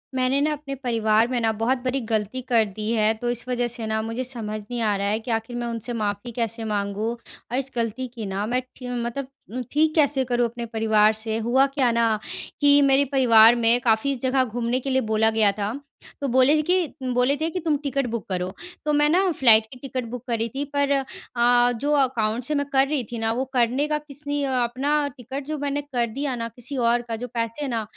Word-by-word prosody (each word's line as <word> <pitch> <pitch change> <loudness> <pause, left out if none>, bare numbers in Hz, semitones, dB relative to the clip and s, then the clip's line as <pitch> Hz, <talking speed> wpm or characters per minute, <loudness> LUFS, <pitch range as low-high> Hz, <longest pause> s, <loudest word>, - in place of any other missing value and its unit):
मैंने 255 +2 +2
न, 290 - +3
अपने 285 -2 -5
परिवार 225 -3 +2
में 250 -1 -1
न 220 - +3
बहुत 245 +4 +1
बड़ी 260 +1 0
गलती 220 +2 -2
कर 235 -3 +3
दी 210 +2 -4
है, 220 -1 +3
तो 240 +2 -4
इस 240 +1 -4
वजह 245 -1 0
से 230 -1 -6
न 220 0 0
मुझे 230 +3 -3
समझ 225 -4 -5
नहीं 235 +3 -5
आ 210 -2 +2
रहा 200 0 -1
है 210 +2 0
कि 230 +2 -5
आखिर 225 +2 -2
मैं 240 0 -3
उनसे 230 +1 -5
माफ़ी 210 +1 -3
कैसे 230 -1 -3
माँगूँ? 205 +1 -1 0.4
और 250 - 0
इस 270 0 -3
गलती 235 +2 -2
की 225 -3 -5
न, 195 +1 -2
मैं 250 +1 +1
ठी 250 - -9 0.2
मतलब 255 +3 -4 0.4
ठीक 310 +1 +2
कैसे 285 -4 +3
करूँ? 245 -1 +1
अपने 235 +1 -5
परिवार 220 -1 +3
से? 220 0 -4
हुआ 240 +4 +3
क्या 255 -4 +3
न 225 -2 +3 0.4
कि 285 0 +6
मेरे 275 0 +4
परिवार 235 -4 +7
में 235 0 +3
काफ़ी 240 +3 +2
जगह 260 +1 +1
घूमने 240 +1 -1
के 270 - -4
लिए 265 0 +2
बोला 220 0 +3
गया 220 -2 +3
था। 205 +2 -1 0.5
तो 280 - 0
बोले 260 +3 +4
थे - - +2
कि 315 -6 -1
बोले 250 +3 +2
थे 320 +3 -1
कि 365 - -3
तुम 315 -3 0
टिकट 275 -1 -1
बुक 235 -2 -4
करो। 180 -1 -2 0.3
तो 300 - +1
मैं 295 0 +4
न 370 +3 +3
फ्लाइट 225 -6 +5
की 255 - -10
टिकट 260 -2 -4
बुक 245 0 -6
करी 230 -1 -1
थी 275 +5 -4
पर 285 0 +2
अ, 245 -3 +2
जो 275 +5 -2
अकाउंट 240 -3 0
से 300 +5 -1
मैं 285 0 0
कर 270 0 +4
रही 285 -3 -1
थी 235 - -4
न, 225 0 0
वो 245 +4 -1
करने 250 +4 +2
का 300 0 0
किसी 290 -1 -4
अ 275 - -1
अपना 285 +5 0
टिकट 265 +3 -6
जो 310 0 -3
मैंने 285 0 -2
कर 260 -5 -1
दिया 270 +3 -3
न, 230 -1 -3
किसी 255 +3 -7
और 240 0 +2
का 230 - -3
जो 245 +3 -5
पैसे 230 +2 -3
है - - -3
न 225 -1 -1
245 Hz, 230 wpm, -24 LUFS, 225-275 Hz, 0.5 s, परिवार